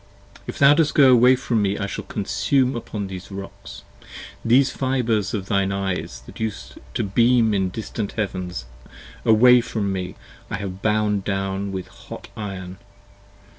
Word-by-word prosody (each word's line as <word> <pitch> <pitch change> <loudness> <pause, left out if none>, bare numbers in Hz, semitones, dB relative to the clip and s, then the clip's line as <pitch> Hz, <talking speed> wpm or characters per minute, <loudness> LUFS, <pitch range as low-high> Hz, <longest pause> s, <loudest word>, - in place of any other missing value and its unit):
If - - -6
thou 140 +1 +7
dost 150 -1 +2
go 135 -3 +7
away 125 +1 +6
from 120 -3 -1
me 100 0 0
I 100 - -2
shall 100 - -5
consume 125 +6 0
upon 105 -3 -4
these 95 -1 -8
Rocks. 100 0 -9 0.6
These 130 +3 +4
fibres 120 -6 0
of 95 -3 -3
thine 100 0 +1
eyes 95 -10 -3
that - - -12
used 110 -2 -5 0.2
to - - 0
beam 115 +2 +3
in 95 -2 +1
distant 110 +1 -5
heavens, 90 - -4 0.6
Away 125 +3 +6
from 105 -4 -2
me, 90 -1 -4 0.3
I - - -2
have 95 -2 -6
bound 105 -2 +1
down 95 0 -2
with 95 -1 -5
a - - -20
hot - - -11
iron. 95 -3 -6
105 Hz, 160 wpm, -22 LUFS, 95-120 Hz, 0.6 s, thou